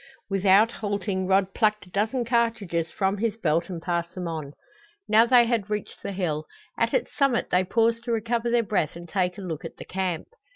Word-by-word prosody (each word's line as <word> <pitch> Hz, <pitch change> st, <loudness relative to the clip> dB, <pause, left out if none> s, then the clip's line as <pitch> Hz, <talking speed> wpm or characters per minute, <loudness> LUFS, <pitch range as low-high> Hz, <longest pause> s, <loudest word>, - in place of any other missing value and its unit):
Without 195 Hz, +3 st, +5 dB
halting 200 Hz, -3 st, -2 dB
Rod 190 Hz, 0 st, +2 dB
plucked 215 Hz, -2 st, +1 dB
a -, -, -17 dB
dozen 220 Hz, +6 st, 0 dB
cartridges 220 Hz, -9 st, 0 dB
from 195 Hz, 0 st, 0 dB
his 225 Hz, -1 st, -1 dB
belt 170 Hz, -3 st, 0 dB
and 175 Hz, -3 st, -4 dB
passed 170 Hz, 0 st, -2 dB
them 180 Hz, -2 st, -4 dB
on. 155 Hz, -4 st, -5 dB, 0.5 s
Now 220 Hz, +2 st, +5 dB
they 245 Hz, -1 st, +6 dB
had 230 Hz, -4 st, -1 dB
reached 210 Hz, -1 st, -4 dB
the 200 Hz, -, -4 dB
hill. 160 Hz, -5 st, -2 dB, 0.3 s
At -, -, +1 dB
its -, -, -1 dB
summit 275 Hz, -4 st, +1 dB
they 180 Hz, +1 st, +4 dB
paused 230 Hz, +4 st, +1 dB
to 240 Hz, -, -2 dB
recover 230 Hz, +1 st, 0 dB
their 235 Hz, 0 st, +3 dB
breath 185 Hz, -8 st, -1 dB
and 170 Hz, 0 st, -9 dB
take 180 Hz, 0 st, -1 dB
a -, -, -7 dB
look 165 Hz, -5 st, -5 dB
at -, -, -8 dB
the -, -, -9 dB
camp. 185 Hz, -3 st, -3 dB
200 Hz, 205 wpm, -26 LUFS, 180-230 Hz, 0.5 s, they